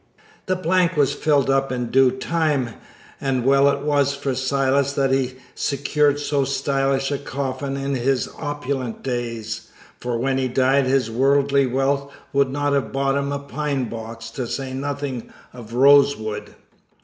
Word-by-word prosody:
The 185 - +1
blank 180 -1 +1
was 145 -1 +3
filled 145 -2 +2
up 135 0 +1
in 125 -2 -3
due 135 0 +5
time, 140 -1 0 0.5
and 130 -3 -1
well 140 +1 +5
it 140 0 -1
was 140 -1 +1
for 140 -1 -2
Silas 135 +1 +1
that 135 -2 +1
he 130 -1 0 0.2
secured 145 +1 +1
so 145 -1 0
stylish 135 0 0
a 140 - -1
coffin 135 0 -3
in 140 0 -2
his 130 0 0
opulent 140 -5 -3
days, 115 -3 -4 0.3
for 120 -1 -2
when 135 +2 0
he 130 - 0
died 130 +2 +2
his 130 -3 +1
worldly 140 +2 +3
wealth 140 +2 0 0.2
would 140 -1 +3
not 145 +1 0
have 140 -1 0
bought 135 0 +1
him 140 0 -1
a 140 - -1
pine 140 -3 -3
box, 115 0 -7
to 125 +1 -4
say 135 +1 -4
nothing 140 -2 -4 0.2
of 115 -2 -9
rosewood. 135 -5 +3
135 Hz, 160 wpm, -22 LUFS, 130-140 Hz, 0.5 s, due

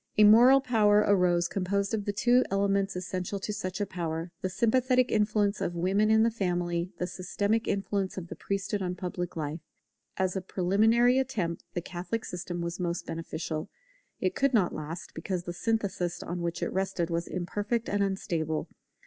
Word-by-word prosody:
A 210 - +7
moral 240 +6 +8
power 210 -4 +4
arose 180 -3 +3
composed 200 +3 -1
of 210 -2 -1
the 205 - 0
two 245 +5 +4
elements 195 0 +1
essential 185 +1 -3
to 210 - -3
such 185 -2 -4
a 205 - +1
power, 165 -2 -4
the 185 - -1
sympathetic 250 +5 +2
influence 210 -1 +1
of 175 - -2
women 195 +5 +2
in 220 0 +5
the 230 - +3
family, 175 -4 -1
the 180 - -1
systematic 205 +5 -1
influence 195 -1 -1
of 180 -2 -5
the - - -7
priesthood 200 +1 -2
on 180 -1 -2
public 180 -1 -4
life. 155 0 -3 0.6
As 185 0 0
a 190 - -1
preliminary 220 +8 +3
attempt 190 -11 -2
the 175 - -1
Catholic 180 +5 -4
system 175 -1 -5
was 170 +1 -4
most 175 -1 -2
beneficial; 160 -1 -4 0.5
but - - -3
it 185 - +2
could 275 -2 +2
not 190 -6 +3
last, 155 +3 -6
because 175 +2 -3
the 175 - -5
synthesis 195 -4 -1
on 175 +1 -4
which 170 0 -2
it - - -2
rested 190 -3 -1
was 170 +1 -1
imperfect 205 +6 -2
and 205 0 0
unstable. 165 -5 -1
190 Hz, 180 wpm, -29 LUFS, 175-210 Hz, 0.6 s, moral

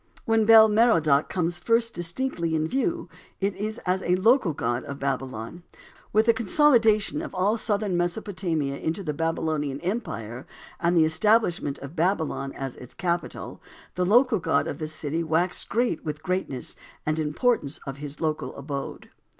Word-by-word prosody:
When 225 -3 +3
Bel 220 0 +9
Merodach 210 -10 +3
comes 175 -1 -1
first 230 +4 +1
distinctly 170 -1 -2
in 155 0 0
view 330 - -1 0.3
it 195 0 -1
is 215 +2 -4
as 185 +1 +1
a 180 - +2
local 220 0 +3
god 120 -4 -2
of 140 - -6
Babylon. 135 +1 -4 0.5
With 215 +1 +3
the 230 - +5
consolidation 230 0 +3
of 315 - -7
all 195 +4 +2
southern 210 -4 -1
Mesopotamia 175 -5 -2
into 165 +5 -2
the 150 -4 -2
Babylonian 155 -3 -1
empire, 125 - -4 0.3
and 175 0 +2
the 160 - +6
establishment 175 -3 +2
of 140 +4 -9
Babylon 160 -5 0
as 135 -2 -5
its 125 - -12
capital, 175 -2 -3 0.3
the 180 - -1
local 230 +4 +4
god 140 - +1
of 145 - -5
this 155 0 -4
city 160 +3 -2
waxed 165 +3 0
great 230 -6 0
with 150 -2 -3
the 150 - -23
greatness 180 -8 -3 0.3
and 155 +1 0
importance 155 - 0
of 135 -1 -6
his 145 0 -7
local 155 -1 -2
abode. 140 0 -6
175 Hz, 160 wpm, -25 LUFS, 150-215 Hz, 0.5 s, Bel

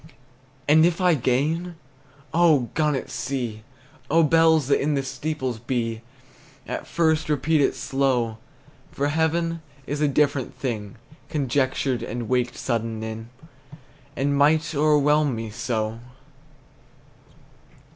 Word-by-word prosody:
And 155 +2 +6
if 170 +1 +2
I 180 -2 +4
gain, 155 +7 0 0.6
oh, 155 -8 +4
gun 150 -2 +1
at 130 - -5
sea, 120 -5 -3 0.5
Oh, 165 +2 +4
bells 160 -1 +4
that 140 - +2
in 150 +1 +1
the 135 - 0
steeples 130 -3 -3
be, 115 -2 -2 0.6
At - - -5
first 160 -2 +1
repeat 150 +1 +2
it - - +2
slow! 125 -5 0 0.5
For 145 +1 -1
heaven 165 +2 0 0.2
is 145 +1 -3
a 150 - +4
different 140 -2 0
thing 110 -4 -4 0.3
Conjectured, 135 -2 0
and 120 0 -4
waked 125 0 0
sudden 115 -2 -2
in, 110 +1 -6 0.9
And 140 +1 0
might 155 +3 +3
o'erwhelm 150 -1 +3
me 115 -1 -5
so! 110 0 -2
140 Hz, 120 wpm, -24 LUFS, 120-155 Hz, 0.9 s, And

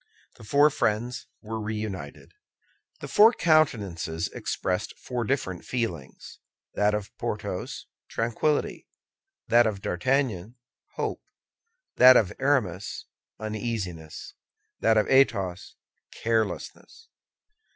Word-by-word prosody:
The - - -14
four 145 +7 +4
friends 120 +1 -1 0.2
were 110 0 -4
reunited. 105 -8 -5 0.7
The - - -5
four 220 +3 +6
countenances 100 - +1
expressed 90 -1 -3
four 125 -2 -4
different 100 -8 -2
feelings: 90 - -5 0.3
that 105 0 +2
of 100 -1 -6
Porthos, - - -4 0.2
tranquillity; 120 +6 -1 0.6
that 120 0 +5
of 100 -3 -4
D'Artagnan, 115 0 0 0.4
hope; - - -3 0.8
that 125 0 +9
of 95 -6 +1
Aramis, 120 -9 0 0.3
uneasiness; 105 -7 -5 0.5
that 110 0 +3
of 105 - +3
Athos, 100 -9 +2 0.4
carelessness. 115 - -3
110 Hz, 95 wpm, -26 LUFS, 95-125 Hz, 0.8 s, that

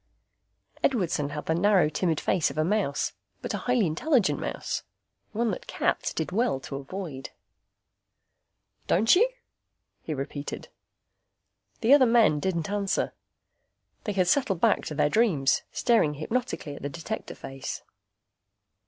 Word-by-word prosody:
Edwardson 175 - +1
had 150 0 -5
the 160 - +1
narrow, 185 0 +4
timid 160 +1 0
face 180 -4 +1
of - - -9
a 155 - +3
mouse; 185 -5 0 0.3
but - - -3
a - - -1
highly 245 -4 +2
intelligent 220 - +2
mouse. - - -3 0.5
One 230 +1 0
that - - -6
cats - - 0
did 160 +2 -3
well 225 - +1
to 135 - -6
avoid. 140 -1 -6 1.6
"Don't 220 - +5
you?" 465 +7 +4 0.7
he 155 - -4
repeated. 140 +1 -5 1.1
The 240 +4 +5
other 270 -3 +7
men 225 -10 +4
didn't 170 +1 -2
answer. 200 -1 0 0.9
They 210 - -1
had 185 -2 +2
settled 195 -4 +2
back - - +3
to 150 - -5
their 150 - +3
dreams, 155 - +2
staring 225 -12 +2
hypnotically 190 - -3
at - - -10
the 145 - -3
Detector 170 +8 -6
face. 135 -1 -6
185 Hz, 135 wpm, -27 LUFS, 150-225 Hz, 1.6 s, other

